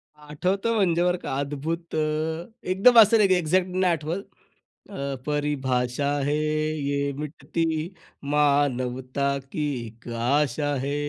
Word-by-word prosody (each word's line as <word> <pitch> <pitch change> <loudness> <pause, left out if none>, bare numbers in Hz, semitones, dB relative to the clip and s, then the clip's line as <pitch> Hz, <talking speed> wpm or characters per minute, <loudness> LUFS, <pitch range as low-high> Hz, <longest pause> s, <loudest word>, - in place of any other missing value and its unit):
आठवतं 180 +9 -2
म्हणजे 175 -4 +2
बरं 180 0 +2
का 135 - -5
अद्भुत 155 +4 -4
अ, 155 +2 -1 0.2
एकदम 225 +6 +6
असं 225 +1 +7
नाही 205 -2 +5
की 185 - +5
एक्झॅक्ट 180 +2 +1
नाही 185 -1 +2
आठवत. 165 +5 -3 0.7
अ, 140 -8 -4
परिभाषा 140 -2 0
है. 145 +1 +1
ये 150 -2 -1
मिटती 160 +2 -2 0.4
मानवता 140 -2 +1
की 150 -1 -2 0.2
एक 115 +2 -15
आशा 145 +4 +1
है. 140 +1 -1
150 Hz, 125 wpm, -25 LUFS, 140-170 Hz, 0.7 s, असं